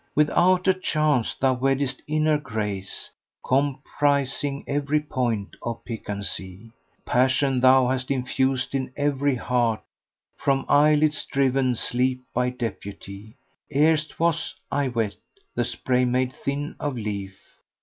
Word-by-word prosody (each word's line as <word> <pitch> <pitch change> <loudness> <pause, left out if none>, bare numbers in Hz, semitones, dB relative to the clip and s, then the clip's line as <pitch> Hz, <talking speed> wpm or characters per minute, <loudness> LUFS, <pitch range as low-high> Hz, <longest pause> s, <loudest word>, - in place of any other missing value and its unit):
With 150 0 +3
outer 185 +1 +4
charms 155 -8 +1
thou 130 -1 +3
weddest 135 +1 0
inner 155 0 +2
grace 105 -7 -4 0.2
* - - -23
Comprising 140 +1 0
every 145 +1 0
point 120 -8 -2
of 115 -1 -5
piquancy: 100 -2 -5 0.3
Passion 130 +1 +2
thou 130 0 +6
hast 130 0 -1
infused 130 0 0
in 130 -2 -2
every 145 -1 +1
heart, 120 -2 0 0.3
* - - -52
From 135 -1 +2
eyelids 150 +1 +4
driven 130 -2 +1
sleep 125 +2 0
by 125 0 +1
deputy: 105 -3 -7 0.4
Erst 155 +1 +2
was 165 -1 0 0.2
(I 140 -1 +1
wot) 115 -5 -1 0.4
the - - 0
spray 125 -1 0
made 125 +1 0
thin 140 +3 -4
of 145 -3 -2
leaf. 100 -3 -4
130 Hz, 125 wpm, -24 LUFS, 120-145 Hz, 0.4 s, thou